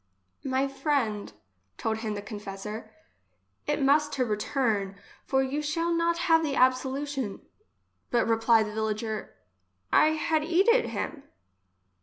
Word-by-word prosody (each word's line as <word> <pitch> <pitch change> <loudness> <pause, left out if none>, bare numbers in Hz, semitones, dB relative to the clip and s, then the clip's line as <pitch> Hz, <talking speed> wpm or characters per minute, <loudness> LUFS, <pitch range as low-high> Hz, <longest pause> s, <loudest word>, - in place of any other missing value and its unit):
" 95 - -47
My 265 0 +1
friend, 270 -7 -1 0.5
told 220 -1 -1
him 220 -2 -3
the 205 - -5
con 205 0 -7
fessor, 210 +2 -7 0.8
it 295 0 0
must 290 +2 +4
to 255 - +1
return, 210 -2 -1 0.4
or 265 0 +4
you 275 +3 -2
shall 330 +3 0
not 335 0 +1
have 325 -1 +5
the 295 -4 -1
absolution. 260 -2 0 0.4
— - - -47
But 235 -2 +2
repply 225 0 +4
the 210 0 -6
villager, 220 0 -3 0.6
I 310 - +5
had 315 0 0
eated 395 +9 +3
him. 295 - -4
260 Hz, 140 wpm, -28 LUFS, 220-300 Hz, 0.8 s, have